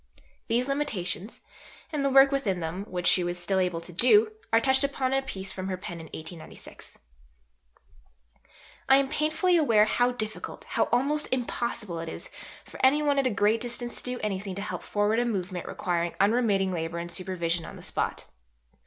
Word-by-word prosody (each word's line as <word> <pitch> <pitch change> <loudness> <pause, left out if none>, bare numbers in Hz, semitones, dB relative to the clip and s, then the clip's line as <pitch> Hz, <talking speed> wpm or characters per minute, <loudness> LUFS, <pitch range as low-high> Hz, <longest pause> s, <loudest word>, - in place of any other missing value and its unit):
These 240 +3 +1
limitations, 225 -8 -2 0.5
and 295 -3 -1
the 275 - +2
work 270 +1 +7
within 220 -10 0
them 175 +4 -4
which 180 -3 -5
she 180 - +5
still 180 +2 0
was - - +4
able 180 -2 -2
to 170 +1 -8
do, 420 - +5 0.2
are 225 - +6
touched 265 +3 +3
upon 270 -2 0
in 270 - +3
a - - -4
piece 195 -7 -6
from 185 0 -5
her 185 -1 -2
pen 175 -2 -7
in 165 - -9
1896. 160 +1 -10 1.9
"I 270 - +8
am 275 -1 +1
painfully 310 +4 +2
aware 225 -9 +5
how 245 +3 +2
difficult, 215 -3 -5
how - - 0
almost 285 +5 0
impossible, 235 -7 -2
it 165 0 -5
is - - -7 0.3
for - - -10
any 285 +3 +5
one 285 -1 +2
at 270 - +2
a - - +2
great 215 +1 +2
distance 240 0 -2
to 250 0 -3
do - - -7
anything 195 -2 -3
to 200 - -4
help - - -4
forward 210 +2 +1
a - - +2
movement 185 -5 -3
requiring 170 -1 -2
unremitting 200 -3 +2
labour 165 0 -3
and 170 0 -5
supervision 175 -2 -1
on - - -9
the - - -12
spot. - - -3
215 Hz, 190 wpm, -27 LUFS, 180-265 Hz, 1.9 s, I